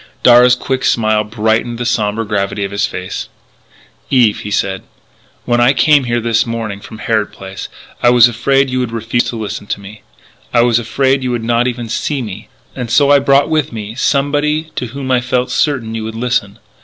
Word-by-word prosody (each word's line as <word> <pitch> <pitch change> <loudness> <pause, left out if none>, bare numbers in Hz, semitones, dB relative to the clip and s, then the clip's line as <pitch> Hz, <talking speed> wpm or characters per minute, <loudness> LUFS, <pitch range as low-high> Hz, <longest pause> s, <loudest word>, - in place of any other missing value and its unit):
Darragh's 125 +1 +7
quick 130 +1 -3
smile 110 -2 +2
brightened 110 +2 -1
the 120 - -4
sombre 115 -2 0
gravity 100 -1 -2
of 100 - -4
his 100 +1 0
face. 90 0 -6 0.8
"Eve," 120 -5 +3
he 105 - -6
said, 95 -2 -1 0.6
"when 120 0 +2
I 120 +3 +5
came 150 0 +4
over 125 - -6
here 120 0 0
this 115 -1 +1
morning 115 -4 -4
from 110 - -11
Harrod 110 -1 -1
Place 95 0 -8 0.3
I 120 - +5
was 120 -1 +7
afraid 135 +3 +1
you 130 - 0
would 125 -2 -2
refuse 115 +1 -1
to - - -4
listen 105 -2 -5
to - - -3
me; 100 +2 -12 0.5
I 120 - +5
was 120 -1 +3
afraid 130 +4 0
you 130 - -2
would 120 -2 -2
not 120 +1 +1
even 120 -2 -4
see 135 +4 -2
me. 105 -5 -8 0.3
And 125 -2 -5
so 140 +4 +4
I 145 - +6
brought 140 +1 +3
with 155 -3 0
me 110 -2 -6
somebody 145 +4 0
to 125 - -3
whom 130 +2 -5
I 125 -1 +3
felt 125 0 -1
certain 130 -8 0
you 110 -1 -4
would 110 0 -6
listen.... 115 -4 -1
120 Hz, 205 wpm, -15 LUFS, 110-130 Hz, 0.8 s, Darragh's